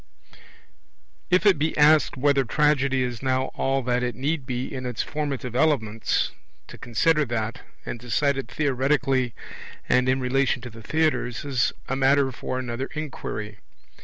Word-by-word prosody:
If 180 +3 +3
it 195 -7 +5
be 155 +2 0
asked 150 -1 +5
whether 140 0 +3
Tragedy 140 0 +2
is 120 -2 -4
now 130 0 0
all 135 0 0
that 125 0 0
it 125 -2 -2
need 140 +1 -2
be 125 +1 -3
in 130 -1 -5
its 120 -2 -2
formative 140 -5 -4
elements, 115 -7 +1 0.4
to - - -11
consider 150 +7 +2
that, 115 -1 -3 0.2
and 120 - -5
decide 135 +4 +1
it 135 -3 -4
theoretically 135 -2 +1 0.5
and 125 0 +3
in 130 +1 +2
relation 130 0 +1
to 120 - -7
the 115 +1 -12
theatres, 140 -2 0
is 130 -4 +1 0.2
a 135 - -1
matter 135 0 +3
for 130 +1 -4
another 130 +1 -3
inquiry. 110 -8 -5
130 Hz, 155 wpm, -25 LUFS, 125-145 Hz, 0.5 s, it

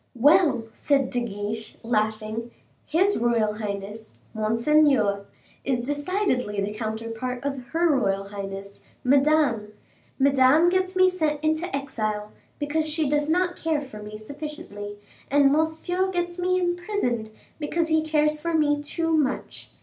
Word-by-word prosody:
"Well," 280 -1 +4
said 275 -3 +1
De 245 -1 0
Guiche, 210 0 -5
laughing, 220 0 -1 0.4
"his 380 +6 +2
royal 230 -3 +2
highness, 210 +1 -6
monseigneur, 225 -2 +2 0.4
is 245 -3 -1
decidedly 290 - -1
the 200 +1 -2
counterpart 230 +3 -4
of 275 -3 -3
her 335 +7 +1
royal 195 -5 0
highness, 200 0 -7 0.2
Madame. 270 -5 +3 0.4
Madame 275 +4 +5
gets 370 +1 0
me 370 0 +6
sent 315 -5 0
into 315 +2 0
exile, 215 -6 -3 0.3
because 305 +2 -1
she 310 -1 +1
does 295 +1 +1
not 355 +2 +1
care 315 -3 -1
for 215 -6 -10
me 210 0 -8
sufficiently; 275 -5 -7 0.3
and 280 0 +5
monseigneur 320 +5 0
gets 350 -1 -2
me 365 +1 +2
imprisoned, 350 - -1 0.3
because 325 +2 -1
he 315 0 +3
cares 305 -1 +1
for 335 0 -1
me 295 -2 +2
too 325 +2 -1
much. 285 -4 -2
280 Hz, 135 wpm, -25 LUFS, 220-315 Hz, 0.4 s, me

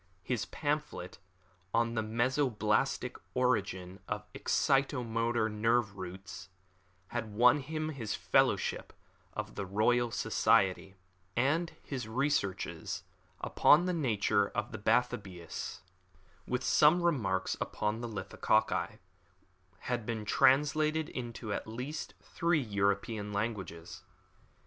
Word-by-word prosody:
His 120 -4 -2
pamphlet, 150 - -3 0.6
On 115 0 +2
the 110 - 0
Mesoblastic 125 +1 0 0.2
Origin 100 -7 0
of 105 0 -3
Excitomotor 120 -5 +1
Nerve 110 0 +1
Roots, 95 0 -8 0.6
had 115 -2 -3
won 125 +5 +6
him 155 +3 -3
his 115 -8 -3
fellowship - - +1 0.4
of - - -5
the 100 - -4
Royal 120 +5 +2
Society; 95 -2 +2 0.4
and 155 +7 +1
his 130 -5 -5
researches, 120 -5 -1 0.4
Upon 155 +4 +5
the 180 - 0
Nature 110 - +2
of - - -2
Bathybius, 100 -9 -1 0.7
with 125 +1 -1
some 165 +4 +5
Remarks 110 - +1
upon 105 +2 -2
Lithococci, 115 -4 0 0.8
had 120 -2 -2
been 110 -2 -3
translated 150 +6 +3
into 120 -3 -5
at - - -4
least 125 +7 -5
three 170 -1 +1
European 100 -1 -1
languages. 100 -6 -4
115 Hz, 100 wpm, -32 LUFS, 105-135 Hz, 0.8 s, won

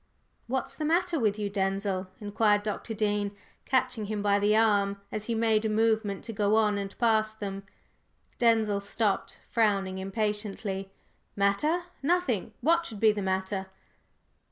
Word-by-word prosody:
"What's 260 +2 -2
the 310 - -5
matter 335 +1 +1
with 215 -3 +1
you, 210 -1 -2
Denzil?" 195 -1 -1
inquired 205 0 +2
Dr. 215 +2 -4
Dean, 205 -1 0 0.3
catching 255 -4 0
him 210 -1 -3
by 205 0 +3
the 205 +1 +3
arm 200 -3 +2
as 215 0 -3
he 230 - -1
made 220 -1 +2
a 220 - 0
movement 220 -2 +1
to 225 - -6
go 205 0 +2
on 210 -2 +3
and 195 0 -6
pass 220 -2 +2
them. 195 -2 -5 0.8
Denzil 220 -4 +3
stopped, 200 0 -1
frowning 195 -4 +1
impatiently. 200 -1 -3 0.4
"Matter? 205 - +2 0.2
Nothing! 285 - 0
What 335 +5 +3
should 215 - -8
be 220 0 +6
the 210 -1 -3
matter?" 190 0 -2
210 Hz, 150 wpm, -28 LUFS, 200-225 Hz, 0.8 s, be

